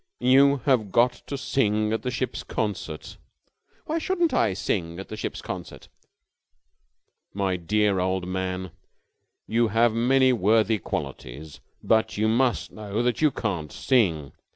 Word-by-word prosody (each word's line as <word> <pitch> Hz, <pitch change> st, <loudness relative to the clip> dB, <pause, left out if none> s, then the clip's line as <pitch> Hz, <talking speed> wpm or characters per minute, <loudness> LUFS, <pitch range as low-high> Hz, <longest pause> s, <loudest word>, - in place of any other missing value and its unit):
"You 135 Hz, +2 st, +4 dB
have 120 Hz, -8 st, +2 dB
got 120 Hz, +4 st, +4 dB, 0.2 s
to 140 Hz, -, -4 dB
sing 110 Hz, -5 st, 0 dB
at 110 Hz, -, -1 dB
the 125 Hz, -, -3 dB
ship's 130 Hz, +1 st, -3 dB
concert." 95 Hz, -7 st, -4 dB, 0.7 s
"Why 320 Hz, +2 st, -1 dB
shouldn't 345 Hz, -1 st, 0 dB
I 100 Hz, -4 st, +2 dB
sing 85 Hz, -4 st, -2 dB
at 95 Hz, -, -8 dB
the -, -, -5 dB
ship's 105 Hz, -, -5 dB
concert?" -, -, -8 dB, 1.5 s
"My 95 Hz, -2 st, 0 dB
dear 100 Hz, +2 st, +1 dB
old 95 Hz, 0 st, -1 dB
man, 95 Hz, -1 st, -3 dB, 0.7 s
you 115 Hz, +1 st, +2 dB
have 115 Hz, +2 st, +3 dB
many 130 Hz, +3 st, +3 dB
worthy 110 Hz, 0 st, +2 dB
qualities, 70 Hz, -2 st, -6 dB, 0.2 s
but 110 Hz, -1 st, +2 dB
you 110 Hz, +1 st, +2 dB
must 115 Hz, -, +1 dB
know 105 Hz, +2 st, -3 dB
that 125 Hz, +2 st, 0 dB
you 155 Hz, -, +5 dB
can't 90 Hz, -, -3 dB
sing. 85 Hz, -, +1 dB
110 Hz, 140 wpm, -25 LUFS, 95-125 Hz, 1.5 s, you